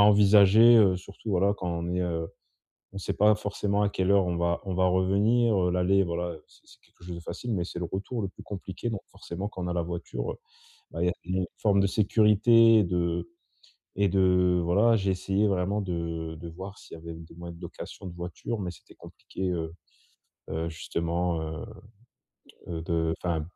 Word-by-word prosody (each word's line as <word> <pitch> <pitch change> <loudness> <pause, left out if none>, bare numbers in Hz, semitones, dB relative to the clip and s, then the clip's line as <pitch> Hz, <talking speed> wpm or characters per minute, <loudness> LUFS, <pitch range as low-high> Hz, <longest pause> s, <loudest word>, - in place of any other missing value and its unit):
envisager, 105 +2 +7
heu, 95 -4 +5
surtout, 100 +4 -11
voilà, 100 +2 +3
quand 90 -3 -5
on 85 0 -3
est 90 - 0
heu, 85 -2 -2 0.7
on - - -7
sait 95 - -3
pas 105 +1 +4
forcément 100 0 -1
à 100 - +2
quelle 95 -1 -1
heure 100 -2 +4
on 85 -1 -1
va 85 0 0
on 95 - -3
va 95 +1 +3
revenir, 100 +5 +3
heu, - - +1
l'aller, 95 +2 +3
voilà, 85 0 -2
heu, 80 - -13
c'est - - -23
c'est - - -18
quelque - - -24
chose 90 -1 -6
de - - -7
facile 120 +7 -5
mais 90 - 0
c'est 85 - -6
le 90 - -2
retour 105 +5 -3
le 100 - -2
plus - - -13
compliqué 100 +3 -5
donc 105 -4 -4
forcément 95 +5 -6
quand 90 - -7
on - - -3
a 90 - -2
la 85 - 0
voiture, 85 0 -4
heu, - - -6 0.6
bah, - - -4
il - - +2
y - - +3
a - - +2
il 90 +1 -3
y - - +1
a - - +1
une 90 - -1
forme 100 -2 +3
de 100 - +3
sécurité 110 +2 +5
de 85 +1 -1 0.7
et 100 -1 +3
de 90 -1 +3
voilà, 105 +7 +4
j'ai 95 -2 0
essayé 95 +3 0
vraiment 100 +2 0
de 85 -3 -4
de 85 - -7
voir 95 +4 -9
s'il - - -12
y - - -12
avait 85 0 -8
des 80 0 -12
moyens 85 0 -9
de - - -16
location 95 - -9
de 85 - -7
voiture 90 +6 -5
mais 90 - -3
c'était 85 - -15
compliqué, 95 -1 -6
heu 80 -2 -3 0.8
heu, 80 +1 -2
justement, 85 +1 -2
heu, 80 +6 -5 1.0
heu, 80 -1 -4
de 80 -1 0
enfin, 85 -3 0
90 Hz, 215 wpm, -27 LUFS, 85-100 Hz, 1.0 s, envisager